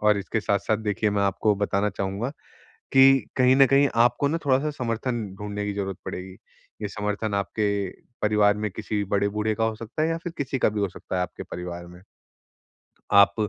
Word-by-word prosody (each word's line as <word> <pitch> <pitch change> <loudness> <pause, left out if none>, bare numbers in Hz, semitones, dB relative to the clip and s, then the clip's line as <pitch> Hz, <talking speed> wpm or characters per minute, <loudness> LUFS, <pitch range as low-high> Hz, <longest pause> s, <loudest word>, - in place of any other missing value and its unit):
और 105 -1 +4
इसके 105 +3 -2
साथ-साथ 105 +1 +1
देखिए 105 -1 0
मैं 100 0 +1
आपको 100 +2 +2
बताना 100 0 0
चाहूँगा 100 +5 -3 0.6
कि 135 0 +6
कहीं 130 0 +5
न 135 - +8
कहीं 140 +1 +5 0.2
आपको 125 +4 +1
ना 165 - 0
थोड़ा-सा 135 +2 +2
समर्थन 120 -3 -2 0.2
ढूँढने 105 0 -4
की 105 - -2
ज़रूरत 95 -2 -3
पड़ेगी। 95 +1 -6 0.5
ये 105 - -1
समर्थन 105 +1 -3
आपके 100 +2 -1 0.5
परिवार 105 -1 +4
में 105 0 -2
किसी 105 +1 -3
बड़े 100 0 +2
बूढ़े 105 +1 -1
का 115 - 0
हो 110 0 -1
सकता 115 +7 -5
है 160 - +1
या 165 - 0
फिर 175 - -5
किसी 135 -1 -2
का - - +4
भी 105 0 -3
हो 100 - 0
सकता - - -7
है - - +1
आपके - - -7
परिवार 85 0 -7
में। 90 +1 -14 1.1
आप 100 0 +7
105 Hz, 195 wpm, -25 LUFS, 100-120 Hz, 1.1 s, न